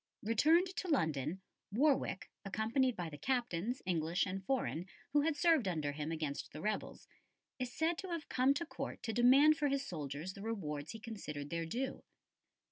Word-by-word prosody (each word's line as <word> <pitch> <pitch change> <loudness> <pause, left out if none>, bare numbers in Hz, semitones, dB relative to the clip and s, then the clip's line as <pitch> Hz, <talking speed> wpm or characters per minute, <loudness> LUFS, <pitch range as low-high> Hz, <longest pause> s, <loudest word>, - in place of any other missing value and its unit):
Returned 305 - +4
to 375 - -2
London, 160 - 0 0.3
Warwick, 265 -3 +1
accompanied 225 +6 +1
by 175 -2 -3
the 145 -2 -8
captains, 245 -2 -1
English 170 0 +1
and 195 0 -4
foreign, 190 -7 -1 0.3
who 295 - +5
had 310 +1 +1
served 320 - +4
under 155 -5 0
him 150 +2 -4
against 155 -3 -3
the 155 - -8
rebels, 215 +5 -3 0.5
is 250 -1 -2
said 320 +5 0
to 380 - -5
have 335 -3 -4
come 260 +2 +3
to 340 - -2
Court - - -6
to 225 - -2
demand 275 +6 +7
for 295 - +2
his 275 0 0
soldiers 155 - -4
the 200 - -10
rewards 155 -9 -3
he 225 - -7
considered 150 -11 -6
their 165 -1 -2
due. 260 +9 -3
220 Hz, 175 wpm, -36 LUFS, 165-275 Hz, 0.5 s, demand